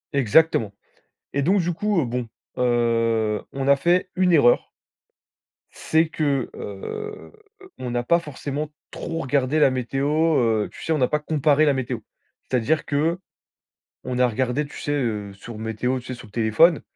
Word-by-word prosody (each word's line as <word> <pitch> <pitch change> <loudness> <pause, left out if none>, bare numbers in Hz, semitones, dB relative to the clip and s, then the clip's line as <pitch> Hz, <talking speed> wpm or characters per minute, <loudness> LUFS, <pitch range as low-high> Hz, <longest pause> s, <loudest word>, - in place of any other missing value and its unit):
Exactement, 125 -4 +3 0.6
et 140 - +1
donc 190 +6 +3
du 175 0 -1
coup, 210 -1 +1
heu, 130 - -1
bon, 120 0 -3 0.3
heu, 115 -3 +1
on 135 0 -2
a 140 - +6
fait 180 +4 +1
une 180 -1 +3
erreur 130 -6 +4 1.0
c'est 160 0 +1
que 140 -6 -1
heu, 430 - -7 0.5
on 125 -1 -5
n'a 120 0 -1
pas 170 +7 +3
forcément 150 0 -5 0.2
trop 165 - -5
regardé 140 +2 +1
la 135 - +5
météo, 130 +2 -2 0.3
heu, 110 -3 +1
tu - - -11
sais, 160 - -2
on - - +1
n'a 125 - +2
pas 150 - 0
comparé 150 0 +2
la 145 - +4
météo. 130 -2 -3 0.4
C'est-à-dire 130 +5 0
que, 160 +5 0 0.9
on 125 0 -2
a 125 - +4
regardé, 130 +5 -1
tu - - -11
sais, 145 - -2
heu, 110 -8 -2
sur 110 +2 -10
Météo, 110 +4 -2
tu - - -15
sais 130 - -5
sur 120 - -12
le - - -18
téléphone, 115 +9 +4
135 Hz, 170 wpm, -23 LUFS, 120-155 Hz, 1.0 s, a